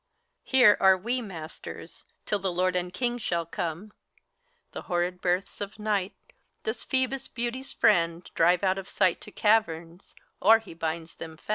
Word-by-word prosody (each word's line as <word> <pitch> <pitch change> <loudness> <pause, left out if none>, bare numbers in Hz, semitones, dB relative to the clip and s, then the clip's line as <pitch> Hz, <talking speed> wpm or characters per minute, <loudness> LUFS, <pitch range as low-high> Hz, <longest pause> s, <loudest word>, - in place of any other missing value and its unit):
Here 250 -6 +6
are 190 -1 +6
we 240 +7 -2
masters, 170 -8 -8 0.2
till 205 - 0
the 190 -1 -1
lord 180 +1 +1
and 180 0 -1
king 240 +5 -1
shall 170 -6 -1
come. 170 +5 -5 0.8
The - - -6
horrid 180 +1 -1
births 180 +3 -1
of 205 0 -5
Night 210 -3 -1 0.5
doth 440 - -4
Phoebus, 260 0 0
Beauty's 245 +2 -4
friend, 170 -5 +2
Drive 175 +3 +3
out 190 0 +2
of 190 - -9
sight 185 -3 +2
to 210 - -11
caverns, 175 -6 0 0.3
or 225 +3 +7
he 220 -6 -11
binds 165 0 -4
them 160 -1 -9
fast. - - -25
190 Hz, 160 wpm, -27 LUFS, 170-220 Hz, 0.8 s, or